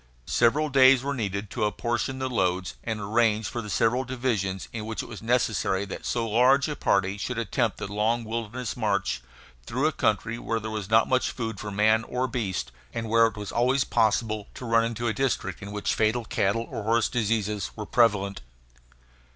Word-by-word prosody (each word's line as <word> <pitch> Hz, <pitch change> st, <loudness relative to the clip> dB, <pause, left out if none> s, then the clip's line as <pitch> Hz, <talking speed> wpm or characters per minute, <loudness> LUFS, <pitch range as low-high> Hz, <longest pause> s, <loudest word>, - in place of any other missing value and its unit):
Several 140 Hz, +6 st, +2 dB
days 130 Hz, -1 st, +6 dB
were 140 Hz, +1 st, -1 dB
needed 100 Hz, -5 st, -3 dB
to 115 Hz, -, -2 dB
apportion 120 Hz, +4 st, -1 dB
the 130 Hz, 0 st, -2 dB
loads 95 Hz, -6 st, 0 dB
and 110 Hz, -2 st, -3 dB
arrange 110 Hz, +1 st, +1 dB
for 120 Hz, -, -4 dB
the 105 Hz, -, -8 dB
several 120 Hz, +6 st, +2 dB
divisions 120 Hz, -7 st, -2 dB
in 110 Hz, -2 st, -5 dB
which 110 Hz, -, -3 dB
it -, -, -9 dB
was -, -, -9 dB
necessary 110 Hz, -4 st, +1 dB
that 100 Hz, -, -7 dB
so 115 Hz, -1 st, 0 dB
large 125 Hz, +6 st, +4 dB
a 150 Hz, -, -3 dB
party 100 Hz, -3 st, +1 dB
should 125 Hz, +3 st, -3 dB
attempt 115 Hz, -1 st, 0 dB
the -, -, -4 dB
long 110 Hz, +4 st, 0 dB
wilderness 115 Hz, +1 st, -4 dB
march, 100 Hz, -5 st, 0 dB, 0.5 s
through 130 Hz, +5 st, -1 dB
a 155 Hz, -, +3 dB
country 115 Hz, -2 st, 0 dB
where 115 Hz, -1 st, -2 dB
there 110 Hz, 0 st, -5 dB
was 105 Hz, -3 st, -4 dB
not 110 Hz, 0 st, +5 dB
much 130 Hz, 0 st, +2 dB
food 115 Hz, -4 st, -4 dB
for 105 Hz, -, -5 dB
man 110 Hz, +2 st, +3 dB
or 125 Hz, +1 st, -1 dB
beast, 95 Hz, -, -3 dB, 0.2 s
and 115 Hz, -1 st, -4 dB
where 115 Hz, 0 st, +5 dB
it 110 Hz, -, -7 dB
was 105 Hz, -1 st, -5 dB
always 125 Hz, +3 st, +2 dB
possible 110 Hz, -2 st, +1 dB
to 125 Hz, -, -7 dB
run 115 Hz, -1 st, +3 dB
into 115 Hz, +1 st, -2 dB
a 110 Hz, -, +1 dB
district 135 Hz, -3 st, -1 dB
in 100 Hz, 0 st, -7 dB
which 105 Hz, 0 st, -1 dB
fatal 110 Hz, +2 st, +1 dB
cattle 110 Hz, +2 st, 0 dB
or 115 Hz, -4 st, -4 dB
horse 115 Hz, +2 st, +2 dB
diseases 105 Hz, -4 st, -1 dB
were 105 Hz, -, -5 dB
prevalent. 105 Hz, -4 st, +2 dB
115 Hz, 195 wpm, -26 LUFS, 105-120 Hz, 0.5 s, days